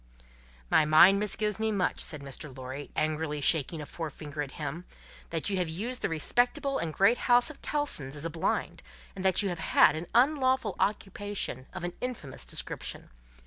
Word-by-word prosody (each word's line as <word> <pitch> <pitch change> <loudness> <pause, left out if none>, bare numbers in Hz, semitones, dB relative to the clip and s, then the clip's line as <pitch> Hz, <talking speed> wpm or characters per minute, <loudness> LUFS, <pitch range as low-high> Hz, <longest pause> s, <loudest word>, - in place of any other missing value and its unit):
"My - - +6
mind 165 +6 +7
misgives 210 0 -1
me 220 0 +1
much," 190 -4 0
said 150 -3 -3
Mr. 135 0 -7
Lorry, 130 +2 -6
angrily 155 -1 -1
shaking 155 +2 +1
a - - -6
forefinger 150 -2 -6
at 140 -1 -5
him, 150 +3 -5 0.5
"that 165 -2 -3
you 195 - 0
have 180 -3 0
used 225 +10 -4
the - - 0
respectable 245 - +1
and 165 - -2
great 200 +9 +4
house 245 +3 +5
of 295 - -16
Tellson's 220 - -1
as 145 +2 -6
a 165 - -2
blind, 165 0 -1 0.3
and 190 - -6
that 190 +1 +3
you 200 - 0
have 175 -2 -4
had - - +5
an 160 +2 -5
unlawful 260 0 +3
occupation 200 - -2
of 185 - -7
an 175 0 -3
infamous 235 - -5
description. - - -5
170 Hz, 180 wpm, -29 LUFS, 150-215 Hz, 0.5 s, mind